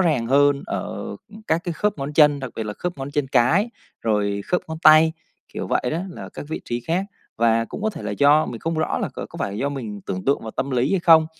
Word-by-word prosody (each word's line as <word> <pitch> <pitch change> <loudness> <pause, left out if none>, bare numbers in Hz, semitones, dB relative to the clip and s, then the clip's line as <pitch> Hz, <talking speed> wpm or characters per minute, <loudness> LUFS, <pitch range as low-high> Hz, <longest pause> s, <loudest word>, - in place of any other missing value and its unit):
ràng 150 -10 +2
hơn 140 +2 +4
ở - - -4 0.3
các 160 +1 +2
cái 175 - -2
khớp 205 +3 -1
ngón 140 +2 -4
chân, 145 -2 +5
đặc 135 -2 -5
biệt 110 - -2
là 105 - -4
khớp 175 +8 -5
ngón 135 +1 -5
chân 145 -1 0
cái, 170 - +3 0.3
rồi 105 -2 0
khớp 180 - +1
ngón 160 - -5
tay, 155 +1 +7 0.4
kiểu - - -4
vậy - - +1
đó, 165 - -1
là - - -8
các - - -9
vị 160 - -4
trí 120 0 -3
khác. 170 +9 -1 0.3
Và 115 0 +3
cũng 210 - -8
có 220 - +1
thể - - -9
là - - -3
do 145 +2 +4
mình 115 - -6
không 165 0 -2
rõ 155 - 0
là - - -2
c - - -19
có - - -7
phải - - -2
là 100 - -5
do 140 - 0
mình 115 -8 -5
tưởng 95 0 -4
tượng 140 - +2
và 110 - -6
tâm 140 - -1
lý 130 +1 +1
hay 195 - +2
không, 160 -2 +6
145 Hz, 265 wpm, -22 LUFS, 120-160 Hz, 0.4 s, tay